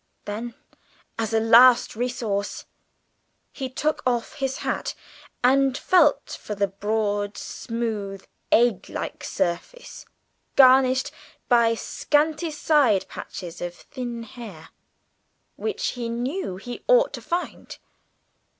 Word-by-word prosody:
Then, 225 +3 -5 0.6
as 225 -1 -1
a 225 - +3
last 235 +2 +6
resource, 225 -4 -2 0.9
he 265 -2 -5
took 305 +4 -1
off 240 -2 -1
his 270 -1 -2
hat - - -2 0.5
and 270 +1 +4
felt 305 -6 +3
for 210 - -5
the 200 0 +1
broad, 205 0 -1
smooth, 215 -5 -4 0.3
egg 230 -5 +3
like - - -5
surface, 485 - -4 0.5
garnished 260 0 +5 0.4
by 235 -2 +4
scanty 305 +7 0
side 290 - +2
patches 175 -2 -8
of 175 0 -4
thin 240 0 -7
hair, 210 -9 -11 0.9
which 440 +1 -2
he 240 -2 -4
knew 245 - -3
he 240 +6 -8
ought - - +4
to - - -6
find. 350 +1 -4
240 Hz, 110 wpm, -24 LUFS, 210-270 Hz, 0.9 s, last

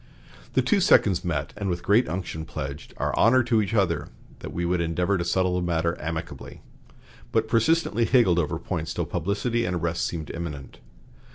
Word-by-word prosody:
The - - +3
two 210 - +3
seconds 100 - +4
met, 75 -4 -2
and, 100 -2 -3
with 85 -1 -3
great 110 +2 +3
unction, 85 -2 -4
pledged 75 -2 -7
"our - - -1
honor 130 +2 +5
to 115 -2 +2
each 105 +2 -2
other 85 -7 +1 0.3
that - - -7
we 85 - -2
would 85 0 +1
endeavor 90 +4 0
to 85 - -1
settle 90 +1 +1
the - - -1
matter 85 -1 0
amicably," 80 +1 -6 0.7
but - - +1
persistently 115 -1 +2
higgled 115 -10 +4
over 80 0 -1
points 80 -2 -4
till - - -1
publicity 115 +6 -1
and 90 -5 -1
arrests 85 0 -1
seemed 80 -4 -5
imminent. 75 -6 -7
90 Hz, 180 wpm, -25 LUFS, 80-105 Hz, 0.7 s, honor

